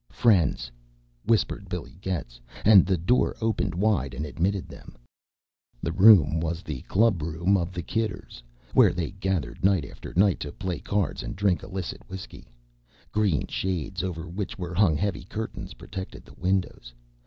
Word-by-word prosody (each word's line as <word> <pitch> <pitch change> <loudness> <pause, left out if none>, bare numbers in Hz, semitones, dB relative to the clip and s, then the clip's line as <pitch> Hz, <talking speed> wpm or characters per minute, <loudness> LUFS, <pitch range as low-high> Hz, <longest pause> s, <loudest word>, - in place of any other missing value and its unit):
"Friends," 85 - +2 0.5
whispered 115 0 +1
Billy - - -6
Getz, 65 -11 -4 0.2
and 100 -5 +8
the 95 -2 +2
door 90 +10 +2
opened 100 -5 0
wide 105 +2 +1
and 75 - -3
admitted 90 +6 -1
them. - - -13 0.9
The 80 - -1
room 95 -4 +7
was 85 +2 -3
the 70 -5 -5
club 105 -4 +3
room 85 +5 +1
of 85 -2 0
the 85 -1 -5
Kidders, 105 - -3 0.3
where - - +6
they 85 -4 -3
gathered 95 -5 -3
night 95 -6 +3
after - - -10
night 95 +1 +4
to 75 - -5
play 95 -2 -4
cards 100 -3 -1
and - - -6
drink 95 -2 +1
illicit 95 -2 -5
whiskey. 95 0 -9 0.6
Green 105 -8 +1
shades 95 0 -3
over 90 -2 -4
which 95 +3 -5
were 90 -2 -5
hung 85 -5 +3
heavy 90 -4 -2
curtains 110 +3 -6
protected 95 -1 -8
the - - -15
windows. 90 -10 -2
95 Hz, 155 wpm, -26 LUFS, 85-100 Hz, 0.9 s, and